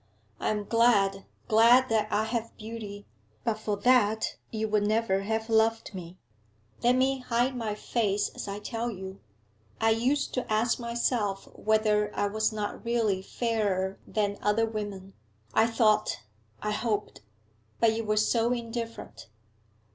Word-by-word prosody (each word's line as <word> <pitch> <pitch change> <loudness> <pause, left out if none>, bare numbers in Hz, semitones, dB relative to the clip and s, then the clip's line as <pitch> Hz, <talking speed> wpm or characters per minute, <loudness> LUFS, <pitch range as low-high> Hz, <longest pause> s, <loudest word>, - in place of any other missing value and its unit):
I - - 0
am 210 -1 -1
glad, 200 -3 +3 0.2
glad 235 +3 +6
that 215 -1 +1
I 215 - +2
have 230 0 -3
beauty; 215 -2 -7 0.4
but 220 -2 -1
for 210 -1 -2
that 220 -1 +3
you 220 -1 -2
would 210 -1 +2
never 215 -3 +1
have 220 +2 -2
loved 225 -1 +2
me. 180 -1 -8 0.6
Let 245 +1 +4
me 265 +1 +2
hide 250 +1 0
my 220 -4 -2
face 210 -2 0
as - - -7
I 200 0 -4
tell 230 +3 -3
you. 190 -2 -7 0.6
I 225 - +3
used 255 +6 +1
to 255 -3 -3
ask 220 +4 +2
myself 235 -4 -1
whether 215 -1 +2
I 205 - +1
was 215 +2 0
not 210 -1 -4
really 225 -5 +1
fairer 200 -3 -1
than 205 -2 -1
other 210 +2 +2
women 205 -3 -6 0.4
I 225 - +4
thought 225 - +2 0.4
I 210 - 0
hoped! 210 -1 -2 0.6
But 225 -1 +4
you 225 - -2
were 215 0 0
so 230 +2 +2
indifferent. 230 -1 -5
220 Hz, 145 wpm, -28 LUFS, 205-230 Hz, 0.6 s, glad